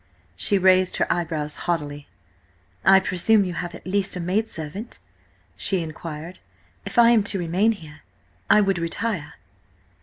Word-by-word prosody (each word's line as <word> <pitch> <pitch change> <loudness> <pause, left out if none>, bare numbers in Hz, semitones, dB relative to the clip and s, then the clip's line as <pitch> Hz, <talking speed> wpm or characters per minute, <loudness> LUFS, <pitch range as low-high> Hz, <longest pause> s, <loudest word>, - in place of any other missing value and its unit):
She 200 - +2
raised 185 -1 +4
her - - +1
eyebrows 160 -3 -3
haughtily. 145 -4 -2 0.8
"I 195 0 +7
presume 195 +3 +2
you 180 - -4
have 175 0 -5
at - - -12
least 195 +1 -1
a - - -4
maidservant," 185 +1 -3 0.6
she 190 - -1
inquired. 160 +2 -8 0.5
"If - - -7
I 235 0 +7
am 230 -2 +5
to 200 - +1
remain 185 +6 +1
here, 155 -6 -12 0.5
I 210 - +6
would 195 -3 +1
retire." 170 0 -3
180 Hz, 145 wpm, -23 LUFS, 165-200 Hz, 0.8 s, I